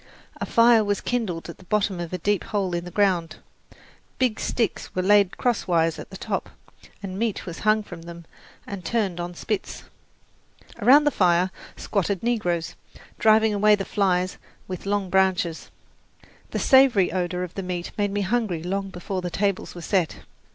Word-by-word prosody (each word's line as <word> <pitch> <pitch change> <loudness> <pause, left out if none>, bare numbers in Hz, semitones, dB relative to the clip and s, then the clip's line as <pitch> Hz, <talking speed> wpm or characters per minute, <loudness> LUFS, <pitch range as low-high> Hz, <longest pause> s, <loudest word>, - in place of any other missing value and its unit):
A - - -4
fire 230 -1 +5
was 205 -1 0
kindled 215 -9 -2
at 170 - -10
the - - -14
bottom 200 -1 0
of 170 -1 -5
a 185 - -2
deep 205 +3 0
hole 195 -4 -1
in 170 0 -2
the - - -6
ground, 180 -4 +1 0.8
big 250 -4 +1
sticks 230 -5 -2
were 185 - 0
laid 200 -1 +4
crosswise 170 -9 +1
at - - -9
the 190 - -9
top, - - -3 0.5
and 190 0 -5
meat 225 -3 -1
was 170 -2 -7
hung 215 0 +2
from 175 -4 -10
them 170 0 -10 0.4
and 200 -3 -7
turned 195 -3 -1
on 175 0 -5
spits. 210 +2 -4 1.0
Around 285 +4 +6
the 295 - +2
fire 180 -2 +2 0.3
squatted 200 -1 -1
negroes, 180 -9 -1 0.5
driving 220 0 +4
away 210 +1 +5
the 195 -1 -4
flies 185 -2 0 0.3
with 185 +1 -6
long 200 -2 -1
branches. 190 -3 +1 0.8
The - - -3
savoury 260 -9 +5
odour 180 -1 -1
of 180 - -7
the 195 - -4
meat 180 -2 -4
made 205 -1 0
me 205 +1 -2
hungry 200 -5 -1
long 195 +2 -2
before 185 +1 -4
the 180 - -3
tables 200 0 -1
were 175 - -7
set. 175 -2 0
190 Hz, 170 wpm, -24 LUFS, 175-210 Hz, 1.0 s, Around